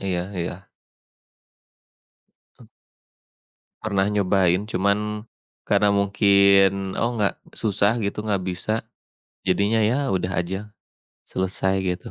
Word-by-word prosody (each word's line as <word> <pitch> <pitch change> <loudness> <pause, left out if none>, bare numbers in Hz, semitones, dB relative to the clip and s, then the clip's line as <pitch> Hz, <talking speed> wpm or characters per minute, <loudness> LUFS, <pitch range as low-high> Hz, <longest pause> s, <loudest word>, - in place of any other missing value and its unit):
Iya 95 0 -3
iya. 90 +2 -5 1.9
E 115 - -16 1.1
Pernah 100 -2 0
nyobain, 95 -1 +2
cuman 105 +2 -1 0.4
karena 105 -1 +2
mungkin 100 -1 +3
oh 120 +1 0
enggak 105 -3 0 0.2
susah 105 0 +1
gitu, 105 +2 -3
enggak 100 -3 0
bisa 90 +3 -3 0.7
jadinya 100 +4 +2
ya 125 +6 +1
udah 90 -1 0
aja, 95 +4 -6 0.5
selesai 95 +1 -1
gitu. 90 -1 -3
100 Hz, 100 wpm, -23 LUFS, 95-105 Hz, 1.9 s, mungkin